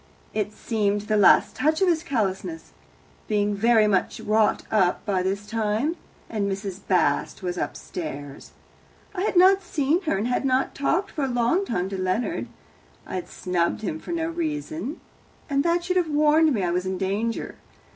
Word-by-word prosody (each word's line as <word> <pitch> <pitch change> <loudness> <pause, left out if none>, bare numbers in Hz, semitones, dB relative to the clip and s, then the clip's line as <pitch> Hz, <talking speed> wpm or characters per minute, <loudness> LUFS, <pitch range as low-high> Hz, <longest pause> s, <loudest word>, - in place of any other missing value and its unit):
It 210 -1 -1
seemed 210 -1 -1
the 215 +1 -1
last 205 -2 +5
touch 310 +4 +1
of 385 - +3
his 335 -3 +2
callousness. 255 - -3 0.6
Being 205 -1 +1
very 220 +1 +4
much 195 -3 +1
wrought 215 0 +2
up 190 -5 +2
by 195 -4 +1
this 195 +2 -2
time 225 +8 -1 0.3
and 200 -3 -2
Mrs. 195 -1 -4
Bast 185 0 +1
was 180 -1 -2
upstairs. 145 -6 -6 0.6
I 365 - -3
had 405 - 0
not 380 +2 +6
seen 320 -1 0
her, 250 - +1
and 210 +4 -1
had 255 +1 +1
talked 345 +8 0
for 295 - -3
a - - -1
long 245 +10 +1
time 180 - -1
to 195 -1 -4
Leonard 185 - -1 0.6
I - - -9
had 180 -2 -3
snubbed 175 0 -1
him 160 -6 -3
for - - -8
no 330 -1 -1
reason, 315 -2 -4 0.5
and 280 -1 +1
that 340 +1 +1
should 365 +1 0
have 345 -3 +1
warned 305 +1 +4
me 215 -8 0
I 175 - 0
was 180 +1 -1
in 190 0 -2
danger. 205 +5 -2
220 Hz, 175 wpm, -25 LUFS, 195-310 Hz, 0.6 s, not